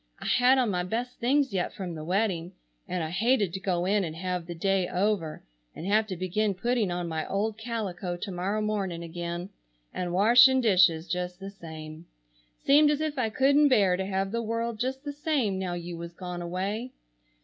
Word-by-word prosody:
I - - -9
had 250 +2 +4
on 245 -5 +2
my 180 -1 0
best 235 +7 -4
things 270 0 +2
yet 185 -2 -1
from 185 -3 -5
the 155 -1 -6
wedding, 180 -1 -1 0.3
and 180 -2 -2
I 155 - -4
hated 210 -1 +2
to 190 - -3
go 180 -2 -1
in 200 +1 +2
and 160 -3 -4
have 180 0 -3
the 175 - -6
day 190 +1 +1
over 185 -4 -1 0.3
and 165 - -7
have 215 +2 +2
to 190 - -4
begin 195 +3 -1
putting 235 +1 0
on 175 0 -2
my 160 -1 -3
old 210 +2 -1
calico 200 -6 -4
to 195 +3 -5
morrow 195 +4 -1
morning 195 -5 -2
again, 170 +2 -5 0.4
and 180 -1 -3
washing 245 +8 +6
dishes 180 -7 +4
just 180 0 -3
the 195 +1 -7
same. 160 -3 -10 0.5
Seemed 295 +2 +5
as 295 -1 +1
if 310 -3 -2
I 225 -3 +1
couldn't 280 +6 +4
bear 200 -8 +4
to 190 +1 -2
have 195 0 -1
the 235 +1 -1
world 230 0 -2
just 265 +3 -2
the 290 -1 -5
same 280 -10 0
now 185 -2 -2
you 175 0 -6
was 170 0 -7
gone 180 0 -6
away. 195 +8 -3
195 Hz, 200 wpm, -28 LUFS, 175-230 Hz, 0.5 s, washing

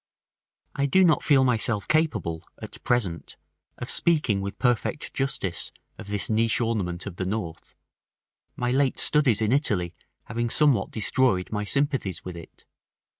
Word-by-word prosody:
§ - - -70 0.7
X. 140 - -2
I - - +3
do 190 +7 +4
not 165 -4 +4
feel 135 -2 +4
myself 115 -4 0
capable 150 - 0 0.2
at - - -9
present 100 -9 -1 0.4
of 120 - -3
speaking 150 - +2
with 100 +1 -5
perfect 125 +4 -1
justice 100 -10 -2 0.3
of 110 - -9
this 100 -2 -1
niche 115 0 +1
ornament 100 -7 -2
of 95 -4 -7
the 95 - -2
north, 95 -6 -5 0.8
my 125 0 -1
late 135 0 +1
studies 130 -8 +2
in 110 - +1
Italy 105 - +2 0.3
having 115 +2 -3
somewhat 140 -7 +3
destroyed 110 -3 +1
my 105 -1 -2
sympathies 135 - -1
with 90 -1 -6
it. 85 - -13
115 Hz, 155 wpm, -25 LUFS, 95-135 Hz, 0.8 s, do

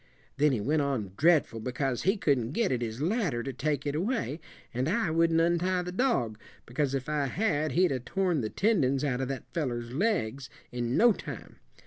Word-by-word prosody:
Then 150 +1 +4
he 125 - 0
went 145 +9 +1
on 130 -9 -2
dreadful 150 -5 +3
because 125 +2 -2
he 195 +3 +2
couldn't 135 - +1
get 230 +1 +1
at 125 -2 0
his 115 +3 -3
ladder 175 - 0
to 135 - -4
take 145 +2 -1
it 145 - -1
away; 175 - -1 0.3
and 125 +5 0
I 200 -3 +1
wouldn't 165 0 +3
untie 175 +2 +2
the 180 - -5
dog, 180 - 0 0.3
because 140 +2 -1
if 130 -1 -3
I 150 -2 0
had 155 - 0
he'd 180 -1 +3
'a' 130 - -1
torn 180 +3 0
the 110 - -2
tendons 145 - +1
out 135 -3 0
of 130 - -1
that 135 -1 -6
fellow's 120 -8 -2
legs 140 - -1 0.2
in 120 0 -1
no 240 0 +6
time. - - -9
145 Hz, 195 wpm, -29 LUFS, 125-175 Hz, 0.3 s, no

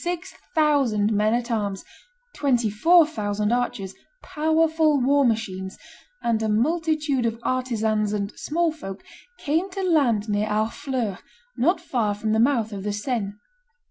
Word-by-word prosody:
six 350 0 -4 0.2
thousand 265 -9 +2
men 210 +1 +2
at 240 +1 -1
arms, 205 -4 -2 0.5
twenty 245 -6 +1
four 330 - +5
thousand 210 -6 -2
archers, 240 -6 -1 0.3
powerful 315 -1 +2
war 280 +3 +3
machines, 195 -5 -2 0.5
and 230 -2 +1
a 220 - 0
multitude 300 +3 +1
of 230 -1 -1
artisans 220 -5 0
and 205 0 -2
"small 335 +2 0
folk," 195 -11 -8 0.3
came 325 +6 -1
to 385 +1 -4
land 265 - +2
near 210 0 0
Harfleur, 220 0 -2 0.4
not 335 +8 +2
far 235 -11 -1
from 215 +1 -2
the 220 - +2
mouth 230 -3 +2
of 195 - -5
the 205 +1 -2
Seine. 205 -1 -2
235 Hz, 140 wpm, -24 LUFS, 210-300 Hz, 0.5 s, four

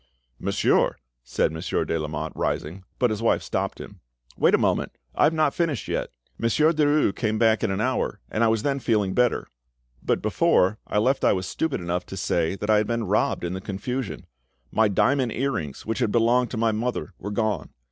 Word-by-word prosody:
"Monsieur—" - - +2 0.3
said - - 0
Monsieur 80 +2 -2
de - - -1
Lamotte, 75 0 -4
rising. 85 +6 -3
But 125 -3 +2
his 110 0 -3
wife 115 - +2
stopped - - -3
him. - - -10 0.4
"Wait - - +4
a - - +3
moment; - - 0 0.2
I - - +3
have 150 - +4
not 155 -3 +2
finished 160 - -1
yet. - - -2 0.3
Monsieur 150 +8 +3
Derues 150 -8 +2
came 110 -2 -1
back 110 0 +3
in 110 - +1
an 95 0 -1
hour, 130 +2 -1
and 110 - +1
I - - +5
was 110 -1 +1
then 140 -1 0
feeling 105 -6 +1
better; 125 -1 +1 0.5
but - - 0
before, 95 +4 +2
I - - -1
left 130 +6 +2
I - - +5
was 95 -1 -2
stupid 155 - -2
enough 90 +1 -2
to 95 - -7
say 85 -1 0
that 105 +2 -5
I 105 - +5
had 105 - +1
been 115 -1 -1
robbed 100 -1 +1
in 85 +1 -2
the 95 - -5
confusion; 105 +5 -4 0.5
my 110 0 +3
diamond 125 +4 +2
earrings, 115 - -3
which 110 -1 -2
had 105 - +1
belonged 120 +2 +3
to 120 - -5
my 115 0 +2
mother, 110 -1 -3
were 105 - -5
gone. 105 -6 -1
110 Hz, 205 wpm, -25 LUFS, 95-125 Hz, 0.5 s, I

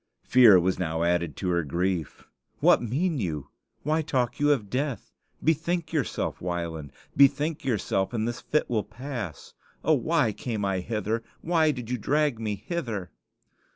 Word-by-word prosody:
Fear 115 -7 +7
was 95 +1 0
now 80 -2 -1
added 85 -3 0
to 90 - -2
her 85 -1 +1
grief. 85 0 -2 0.4
"What - - +5
mean 145 +7 0
you? 75 - -3 0.3
Why 155 +2 +1
talk 130 -6 -1
you 145 0 +4
of 120 -8 +1
death? 135 +3 -3 0.3
Bethink 165 +1 0
yourself, 150 -5 -1
Wieland; 85 -5 -4 0.2
bethink 145 +3 +3
yourself, 100 -5 0
and 115 -2 -1
this 120 0 -4
fit 150 - 0
will 110 -4 0
pass. 120 - -7 0.3
Oh, - - +4
why 110 - +2
came 105 -1 -3
I 95 -1 0
hither? 110 +3 -2 0.2
Why 160 -2 +3
did 125 -5 -3
you 125 - -1
drag 145 0 +1
me 105 -2 -2
hither?" 110 - -4
115 Hz, 155 wpm, -27 LUFS, 90-145 Hz, 0.4 s, Fear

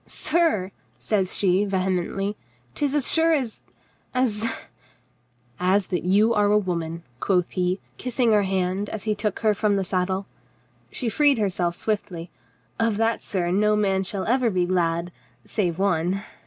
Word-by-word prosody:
"Sir," 315 - +1 0.3
says 195 -4 0
she 190 0 +3
vehemently, 190 +1 -1 0.2
" 120 0 -36
'tis 290 -1 -1
as 290 -4 +3
sure 325 0 +4
as 255 -8 -2 0.3
— - - -38
as 230 -3 +1 0.6
— 120 0 -38 0.2
"As 200 -1 +2
that 180 - -1
you 205 +6 +3
are 210 -2 +3
a 210 - +5
woman," 170 -4 -3 0.2
quoth 180 -3 +1
he, 180 +1 0 0.2
ki.ssing 250 -2 +1
her 210 - +5
hand 190 +1 -1
as 220 - -5
he 215 - 0
took 210 -1 -2
her 215 -1 +3
from 205 0 +1
the 195 - 0
saddle. 190 +1 -1 0.7
She 245 - -4
freed 285 +3 +4
herself 180 -5 0
swiftly. 180 -6 -3 0.5
"Of 225 -2 +1
that, 225 +1 +1
sir, 175 -4 -2
no 210 +3 +3
man 195 -2 +1
shall 195 0 -2
ever 250 0 +2
be 180 -3 +1
glad, 175 -1 0 0.3
save 175 -6 -1
one." 190 0 0
195 Hz, 165 wpm, -24 LUFS, 180-215 Hz, 0.7 s, a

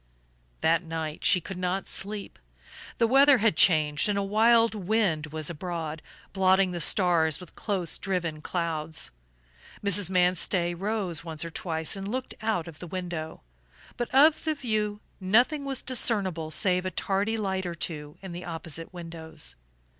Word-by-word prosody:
That 165 +1 +3
night 160 -2 -5
she 185 - +6
could 180 +2 -8
not 185 +1 -2
sleep. 200 - -3 0.6
The 230 - +3
weather 275 +3 +6
had 225 -6 +2
changed 155 0 +4
and 205 - 0
a 200 - 0
wild 225 +3 +4
wind 195 -6 0
was 155 0 -4
abroad, 165 -2 -4 0.3
blotting 190 -1 +3
the 175 - -4
stars 170 -5 +3
with 180 - -13
close 190 -6 -1
driven 175 -5 -2
clouds. 160 -2 -3 0.7
Mrs. 200 -2 +4
Manstey 180 -1 +2
rose 190 -3 -2
once 160 -1 -4
or 165 - -6
twice 160 -1 -2
and 195 0 -6
looked 255 +4 -3
out 215 -7 -1
of 160 -2 -11
the 175 - -8
window; 170 -3 -5 0.5
but 240 - -3
of 300 +4 +5
the 315 -1 0
view 215 -6 -2 0.2
nothing 245 +10 +2
was 270 -2 -2
discernible 195 -10 +1
save 180 +3 +1
a 185 - -2
tardy 200 +4 -1
light 190 -3 -2
or 170 - -4
two 150 -3 -4
in 190 - -7
the 175 +1 -7
opposite 165 -1 -4
windows. 165 -3 -7
180 Hz, 155 wpm, -27 LUFS, 165-210 Hz, 0.7 s, she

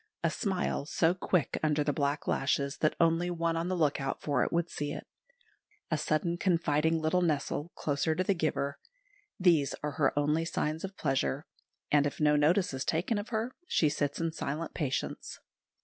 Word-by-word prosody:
A - - +2
smile, 190 - -1
so 165 +1 +2
quick 180 -3 0
under 150 -1 +2
the 145 0 0
black 145 +1 -1
lashes 140 +1 0
that 155 - +1
only 165 +1 +3
one 170 -1 0
on 165 +1 -1
the 185 - 0
look 150 -3 +1
out 135 0 -2
for 145 -4 +1
it - - -2
would 170 0 +1
see 145 -3 -4
it, - - -6 0.9
a 155 - +2
sudden 155 +3 0
confiding 165 -3 +2
little 160 +3 +1
nestle 155 0 -1
closer 155 +2 0
to 185 - +1
the 200 - +2
giver 155 -5 -1 0.6
these 165 -7 +3
are 150 - -1
her 145 -1 +2
only 150 +3 +2
signs 160 -1 -2
of 195 0 -6
pleasure; 135 0 0 0.5
and 145 -1 +4
if 145 - -6
no 150 -1 +4
notice 160 +4 +3
is 130 0 -2
taken 185 +7 0
of 205 - -6
her, 230 +2 -2
she 155 - +3
sits 145 -1 -1
in 165 0 0
silent 160 +1 -4
patience. 140 -5 -3
155 Hz, 185 wpm, -30 LUFS, 145-170 Hz, 0.9 s, and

